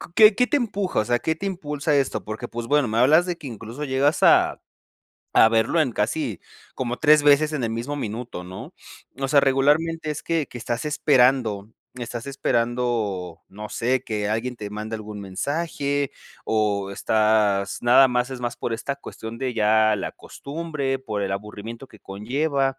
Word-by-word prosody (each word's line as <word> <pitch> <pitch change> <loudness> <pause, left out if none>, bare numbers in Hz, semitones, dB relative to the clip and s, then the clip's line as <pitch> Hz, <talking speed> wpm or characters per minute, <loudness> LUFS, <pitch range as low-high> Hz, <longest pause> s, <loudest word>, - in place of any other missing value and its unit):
qué 215 -2 +7
qué 250 +2 +2
te 290 - +2
empuja? 205 - -1
O - - -4
sea, 120 +1 +1
¿Qué 160 +5 -1
te 200 - -6
impulsa 150 -6 -3
a 145 - +4
esto? 130 -6 0
Porque, 110 +1 -5
pues, 115 0 -6
bueno, 145 -3 +3
me 110 - -2
hablas 150 +8 +5
de 175 -2 -3
que 155 - -9
incluso 115 +4 -7
llegas 140 +2 +1
a - - +4 0.7
a 110 - +7
verlo 115 +8 +2
en 130 -6 +1
casi 115 - -2 0.3
como 125 -1 -3
3 150 -1 +5
veces 145 +1 +4
en 145 -5 -2
el 115 - -1
mismo 120 +6 -3
minuto, 115 -6 -5
¿no? 95 +1 -9 0.5
O 135 - -1
sea, 140 0 +5
regularmente 150 +4 +2
es 150 - -4
que 165 -4 -1
que 120 - -8
estás 120 +4 -3
esperando 125 -8 +2 0.2
estás 120 0 -6
esperando, 115 -9 -1
no 105 +2 -8
sé, 125 +2 0
que 105 -2 -2
alguien 115 +4 -2
te 105 -3 -7
mande 110 +1 -5
algún 105 -1 -7
mensaje, 140 - -2 0.3
o, 100 -3 0
estás 105 -2 +1
nada 125 +3 +7
más 125 +1 -1
es 130 - -5
más 120 -1 -3
por 120 - -3
esta 125 +5 -3
cuestión 115 -4 -9
de 130 0 -2
ya 110 -1 +3
la - - -4
costumbre, 140 -3 -4
por 110 -6 -3
el 95 0 -2
aburrimiento 105 +5 -7
que 110 - -17
conlleva, 135 +6 -1
125 Hz, 180 wpm, -23 LUFS, 110-145 Hz, 0.7 s, qué